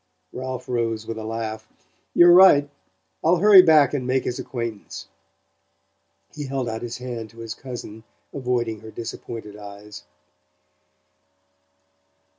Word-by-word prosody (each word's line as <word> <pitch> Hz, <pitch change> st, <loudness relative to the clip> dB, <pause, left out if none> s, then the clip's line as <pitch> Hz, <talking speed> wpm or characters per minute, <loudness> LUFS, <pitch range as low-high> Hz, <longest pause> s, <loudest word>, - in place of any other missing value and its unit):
Ralph 130 Hz, 0 st, -6 dB
rose 115 Hz, -3 st, -2 dB
with 115 Hz, 0 st, -6 dB
a -, -, -6 dB
laugh. 110 Hz, 0 st, -5 dB, 0.5 s
"You're 175 Hz, 0 st, +7 dB
right. 175 Hz, -6 st, +7 dB, 0.6 s
I'll 170 Hz, +3 st, +4 dB
hurry 200 Hz, +1 st, +8 dB
back 155 Hz, -5 st, +5 dB
and 130 Hz, -4 st, -2 dB
make 130 Hz, 0 st, +1 dB
his 125 Hz, -, -4 dB
acquaintance." 115 Hz, -4 st, -6 dB, 1.3 s
He 145 Hz, -2 st, -6 dB
held 130 Hz, -2 st, -3 dB
out 115 Hz, 0 st, -4 dB
his 120 Hz, 0 st, -5 dB
hand 120 Hz, -3 st, -6 dB
to 115 Hz, -, -21 dB
his 115 Hz, -1 st, -6 dB
cousin, 120 Hz, -4 st, -9 dB, 0.3 s
avoiding 120 Hz, -4 st, -2 dB
her 110 Hz, -, -11 dB
disappointed 115 Hz, -2 st, -8 dB
eyes. 105 Hz, -1 st, -11 dB
120 Hz, 125 wpm, -23 LUFS, 110-135 Hz, 1.3 s, hurry